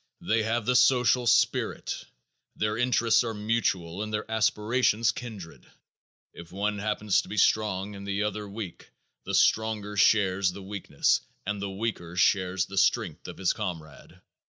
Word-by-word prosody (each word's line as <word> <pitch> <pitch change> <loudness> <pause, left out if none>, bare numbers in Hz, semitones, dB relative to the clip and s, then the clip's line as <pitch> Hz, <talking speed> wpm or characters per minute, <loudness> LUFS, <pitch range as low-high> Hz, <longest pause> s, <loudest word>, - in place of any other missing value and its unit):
They 110 +1 +1
have 110 0 -1
the 125 - +1
social 125 -1 +4
spirit. - - +1 0.5
Their 105 0 -1
interests 120 -1 +3
are 115 -2 -4
mutual 105 -5 -1
and 110 0 -4
their 105 0 -2
aspirations 110 +1 +2
kindred. 105 -9 -9 0.6
If 85 -1 -12
one 100 +2 -2
happens 105 -1 +1
to - - -14
be 105 - -6
strong 105 -1 +1
and 100 0 -9
the 100 +1 -1
other 105 -1 -3
weak, 100 -3 -8 0.4
the - - -2
stronger 105 -2 +1
shares 95 -1 +3
the 100 - -9
weakness 100 0 0 0.2
and 105 0 -3
the 100 - -3
weaker 95 -4 -4
shares 90 0 +2
the 95 +1 -2
strength - - 0
of - - -8
his 95 - +1
comrade. 80 -8 -7
105 Hz, 155 wpm, -27 LUFS, 95-110 Hz, 0.6 s, social